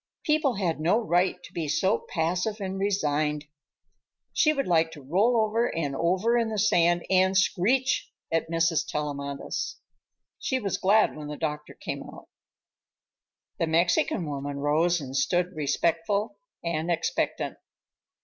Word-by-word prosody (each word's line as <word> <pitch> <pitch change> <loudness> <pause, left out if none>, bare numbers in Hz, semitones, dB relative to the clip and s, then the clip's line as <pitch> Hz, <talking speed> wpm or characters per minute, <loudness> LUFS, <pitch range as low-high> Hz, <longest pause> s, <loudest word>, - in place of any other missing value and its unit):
People 300 -5 +2
had 175 -6 -1
no 170 +7 +3
right 185 -4 +1
to - - -13
be 165 -2 -3
so 190 +8 +1
passive 180 +6 -1
and 190 -1 -4
resigned. 150 -7 0 0.9
She 305 - +4
would 275 -3 -1
like 165 -2 +3
to 150 - -11
roll 205 - +2
over 220 +2 +2
and 145 -4 -2
over 190 - +2
in 230 -1 0
the 215 - -3
sand 175 -4 +3
and 190 0 +4
screech 230 +8 +1 0.2
at 165 0 0
Mrs. 165 -1 +2
Tellamantez. 140 -2 -3 0.6
She 260 - 0
was 200 -6 -2
glad 210 +3 +3
when 150 -1 -7
the 150 0 -6
doctor 150 -2 -4
came - - -5
out. - - -12 1.3
The 165 - +1
Mexican 170 +1 +2
woman 140 -1 -4
rose 160 +5 +2
and 135 -2 -7
stood 175 +6 +1
respectful 170 - 0 0.2
and 170 0 -2
expectant. 165 -1 -1
170 Hz, 140 wpm, -27 LUFS, 155-200 Hz, 1.3 s, She